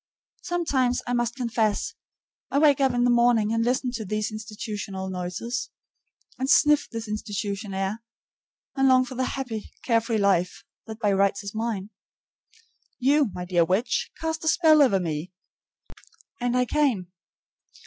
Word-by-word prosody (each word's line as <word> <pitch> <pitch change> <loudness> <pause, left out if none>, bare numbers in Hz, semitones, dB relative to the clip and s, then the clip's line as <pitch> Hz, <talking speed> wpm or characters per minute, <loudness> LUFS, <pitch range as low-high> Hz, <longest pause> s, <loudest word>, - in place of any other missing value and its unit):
Sometimes, 280 -8 0
I 245 - -2
must 240 -1 0
confess, 230 -4 -1 0.6
I - - 0
wake 285 -2 +4
up 265 -1 +4
in 245 0 +1
the 245 - +4
morning 235 -3 +3
and 230 0 +1
listen 250 +1 0
to 235 -3 -4
these 215 +2 -2
institution 215 -2 -6
noises, 190 +6 -4 0.7
and 265 +1 -1
sniff 295 +4 +4
this 230 -1 -6
institution 205 -1 -4
air, 195 +4 -2 0.7
and 270 -1 +3
long 255 -1 +5
for 255 - -8
the 255 +1 -1
happy, 235 -5 -5
carefree 230 -1 +1
life 190 -3 +1 0.2
that 220 -1 -7
by 210 -3 +1
rights 200 +1 +1
is 200 - -6
mine. 220 -3 -3 1.1
You 280 0 +3
my 180 0 -6
dear 175 -1 +3
witch, 195 +8 0
cast 320 0 -3
a - - -3
spell 315 -2 +5
over 240 -9 +4
me, 165 0 -4 1.1
and 245 0 0
I 250 - +3
came. 245 -11 0
230 Hz, 150 wpm, -25 LUFS, 200-255 Hz, 1.1 s, long